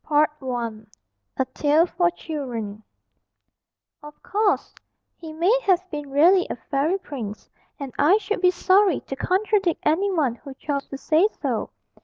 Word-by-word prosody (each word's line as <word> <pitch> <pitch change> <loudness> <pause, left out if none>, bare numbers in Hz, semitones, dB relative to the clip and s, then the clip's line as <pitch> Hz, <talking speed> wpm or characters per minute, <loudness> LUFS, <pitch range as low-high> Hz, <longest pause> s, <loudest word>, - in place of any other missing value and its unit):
_ 260 -8 -1 0.5
A 265 - +1
TALE 300 +3 +3
FOR 350 0 +1
CHILDREN. 245 -11 -6
[Illustration: - - -38 1.2
O] 295 - -10
Of 295 - -15
course 410 +1 0 0.4
he 320 -2 -9
may 345 +9 +2
have 370 -2 +2
been 295 -2 -5
really 345 +7 +4
a - - -3
fairy 275 +9 -1
prince, 240 - -7 0.3
and 275 -3 -6
I 320 +8 +5
should 425 -2 -3
be 365 - +5
sorry 375 -1 +3
to 270 - -6
contradict 385 +2 0
any 355 +7 +2
one 300 -10 +1
who 270 +3 -11
chose 280 0 -3
to 275 - -7
say 320 +7 +3
so. - - -2
310 Hz, 155 wpm, -23 LUFS, 275-365 Hz, 1.2 s, I